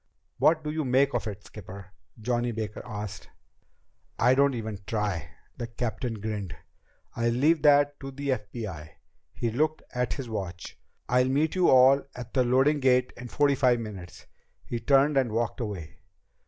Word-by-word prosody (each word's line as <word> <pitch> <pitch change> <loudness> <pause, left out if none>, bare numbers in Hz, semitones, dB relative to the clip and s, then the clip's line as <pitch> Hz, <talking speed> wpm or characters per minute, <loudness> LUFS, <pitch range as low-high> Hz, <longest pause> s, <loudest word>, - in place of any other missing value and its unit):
"What 160 -1 +4
do 150 - -3
you 155 0 -2
make 135 +1 +2
of 120 -2 -1
it, 105 -1 -7
skipper?" 100 -2 -11 0.3
Johnny 120 +1 -1
Baker 110 -2 -5
asked. 105 -1 -7 0.9
"I 125 +3 +4
don't 140 0 +3
even 110 -3 -5
try." 100 -7 -2 0.3
The 120 -2 -4
captain 120 0 -3
grinned. 105 -3 -4 0.6
"I'll 115 0 +1
leave 145 +7 +3
that 145 -1 +4
to 135 - -7
the 140 +1 -5
FBI." 105 - -4 0.4
He 115 - -2
looked 155 +6 0
at 125 0 -1
his 135 -4 -6
watch. 95 -6 -6 0.3
"I'll 125 +1 +3
meet 150 +4 +1
you 185 -2 +3
all 130 +2 +6
at 125 -1 -8
the 130 - +3
loading 135 +5 +3
gate 125 -1 +2
in 125 - -8
forty 145 +3 +2
five 125 -3 +3
minutes." 100 -6 -8 0.4
He 120 - -3
turned 140 +4 +3
and 130 -4 +2
walked 115 +2 -1
away. 100 -10 -6
120 Hz, 165 wpm, -27 LUFS, 110-135 Hz, 0.9 s, all